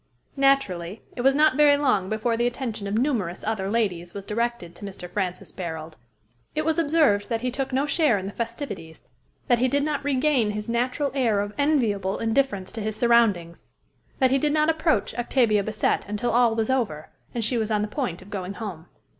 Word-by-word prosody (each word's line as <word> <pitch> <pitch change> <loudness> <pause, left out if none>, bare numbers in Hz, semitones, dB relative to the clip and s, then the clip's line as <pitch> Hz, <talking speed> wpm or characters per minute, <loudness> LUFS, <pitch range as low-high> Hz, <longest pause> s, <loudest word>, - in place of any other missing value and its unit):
Naturally, 220 -10 +1
it 245 - -3
was 270 +2 +4
not 310 +1 +4
very 295 -1 +6
long 200 -10 +1
before 220 +2 0
the 240 +1 +1
attention 235 -5 -4
of 200 - -2
numerous 225 - -1
other 205 -3 -2
ladies 185 -6 -1
was 200 -1 -6
directed 230 -5 -2
to - - -14
Mr. 190 -3 -7
Francis 180 0 -3
Barold. 160 -3 -6 0.6
It 310 0 -1
was 320 +1 +1
observed 290 -10 +2
that 230 -1 -1
he 250 0 -1
took 270 +1 -3
no 265 +2 +1
share 295 -6 +3
in 190 - -5
the 195 - -4
festivities, 225 - -6 0.4
that 245 -3 +3
he 255 - +3
did 280 +2 +1
not 295 -2 -1
regain 275 -4 +2
his 210 +1 -4
natural 250 +4 0
air 235 -7 +2
of 205 +1 -3
enviable 225 -10 +1
indifference 225 -5 0
to 225 - -6
his 215 0 -3
surroundings, 215 -8 +2 0.5
that 260 -1 +3
he 270 - +3
did 295 +1 +1
not 305 +1 +3
approach 315 - 0
Octavia 235 -4 +2
Bassett 215 0 0
until 210 +4 -1
all 235 -1 +3
was 225 +2 0
over, 205 - -2 0.2
and 230 -2 0
she 240 +1 +1
was 220 -1 -1
on 210 -1 +1
the - - -1
point 210 - -3
of 200 - -16
going 195 -1 -4
home. 185 -7 -7
230 Hz, 200 wpm, -25 LUFS, 200-270 Hz, 0.6 s, very